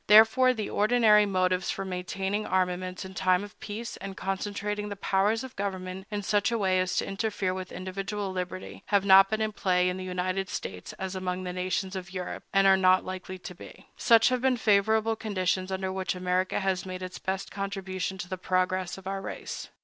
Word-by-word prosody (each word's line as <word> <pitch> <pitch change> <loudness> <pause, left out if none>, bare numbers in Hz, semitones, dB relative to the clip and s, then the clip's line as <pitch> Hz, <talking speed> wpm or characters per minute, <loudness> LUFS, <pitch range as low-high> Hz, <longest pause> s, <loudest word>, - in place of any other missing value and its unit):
Therefore, 220 +5 +7
the 220 -5 -3
ordinary 210 -1 +4
motives 185 -1 +1
for 195 - -2
maintaining 190 +3 -2
armaments 185 0 -1
in 190 - -9
time 185 0 +2
of 205 +1 -11
peace, 220 +2 -6
and 195 -1 -7
concentrating 205 +2 -3
the 205 - -4
powers 200 +4 +1
of 260 -1 -9
government 190 -1 -4
in 205 -1 -3
such 205 +3 +2
a 230 - +1
way 190 -3 +2
as 185 0 0
to - - +1
interfere 195 -2 -1
with 185 0 -6
individual 195 +2 -4
liberty, 185 0 -5
have 200 -1 +2
not 195 0 +8
been 220 0 -1
in 215 0 0
play 180 -3 +2
in 180 - -3
the 185 - -5
United 185 +1 -2
States 90 - -5
as 190 0 -5
among 185 0 -3
the 180 -1 -4
nations 185 +1 -2
of 185 -1 -6
Europe, 180 -1 -4
and 195 0 +4
are 195 0 +7
not 185 0 +4
likely 185 0 -6
to 180 0 -9
be. 175 - -13
Such 230 -2 +5
have 255 -1 0
been 260 -1 +3
the - - -8
favorable 220 +2 +3
conditions 185 -3 -1
under 190 0 -2
which 190 0 -2
America 180 +2 0
has 190 -1 0
made 185 0 -6
its 185 0 -6
best 190 0 -3
contribution 190 -1 -3
to 180 - -6
the 185 0 -5
progress 185 0 0
of 195 - -12
our 195 0 -3
race. - - -6
190 Hz, 205 wpm, -28 LUFS, 185-205 Hz, -, not